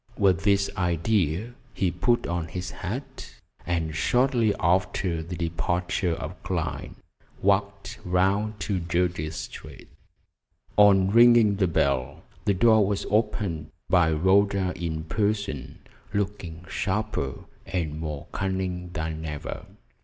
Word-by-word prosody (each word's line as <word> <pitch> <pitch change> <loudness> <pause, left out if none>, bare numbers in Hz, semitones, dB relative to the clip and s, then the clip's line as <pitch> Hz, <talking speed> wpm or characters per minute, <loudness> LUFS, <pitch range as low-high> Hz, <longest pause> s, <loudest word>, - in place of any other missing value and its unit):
With 95 -5 +3
this 100 0 +3
idea 90 +3 0 0.2
he 95 -3 +1
put 120 +8 +1
on 85 -2 -2
his 90 +2 -5
hat, - - -6 0.3
and 80 -2 -1
shortly 120 - +2
after 90 -1 +1
the 85 +2 -6
departure 85 +1 -1
of 80 +2 -6
Clyne 90 -4 -3 0.5
walked 100 0 0
round 100 +4 +1
to 100 -3 -1
Jersey 85 -2 -1
Street. 80 - -9 0.9
On 100 -2 +6
ringing 115 -3 +6
the 95 -2 +2
bell, 70 -6 0 0.2
the 100 - +3
door 110 +2 +5
was 100 0 -1
opened 105 -7 0 0.2
by 85 -3 +5
Rhoda 95 +3 +3
in 80 -2 -3
person, 100 - -2 0.4
looking 95 -4 -3
sharper 95 -11 -2 0.2
and 80 -4 -2
more 75 -3 -5
cunning 95 -2 -2
than 80 0 -3
ever. 75 -2 -6
90 Hz, 115 wpm, -26 LUFS, 80-100 Hz, 0.9 s, On